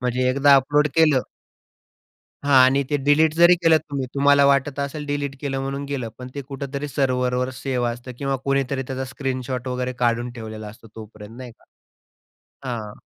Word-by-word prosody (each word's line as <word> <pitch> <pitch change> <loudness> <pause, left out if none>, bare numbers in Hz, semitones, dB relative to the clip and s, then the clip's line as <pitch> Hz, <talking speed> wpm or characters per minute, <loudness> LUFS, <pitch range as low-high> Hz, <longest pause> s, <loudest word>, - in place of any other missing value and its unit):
म्हणजे 125 +1 0
एकदा 140 +2 +5
अपलोड 145 +2 +2
केलं 155 -5 +4 1.2
हां 140 -1 +2
आणि 135 +2 +3
ते 145 - +2
डिलीट 155 +2 +4
जरी 170 +2 +6
केलं 160 -1 +5
तुम्ही 140 -4 -5
तुम्हाला 140 0 +4
वाटत 140 0 +1
असेल 140 +2 -4
डिलीट 145 -1 -3
केलं 135 -2 -3
म्हणून 135 +1 -4
गेलं. 135 -5 -4
पण 125 0 -8
ते 140 - -5
कुठेतरी 140 +1 -6
सर्व्हरवर 125 -2 0
सेव्ह 125 -3 -1
असतं 120 +2 -8
किंवा 135 -1 -1
कुणीतरी 135 -1 0
त्याचा 130 0 -5
स्क्रीनशॉट 130 -2 -4
वगैरे 125 0 -2
काढून 120 0 0
ठेवलेला 110 -2 -8
असतो 115 +2 -14
तोपर्यंत 110 0 -11
नाही 125 -2 -9
का? - - -28 1.1
हां. 110 -4 -5
135 Hz, 165 wpm, -22 LUFS, 125-140 Hz, 1.2 s, जरी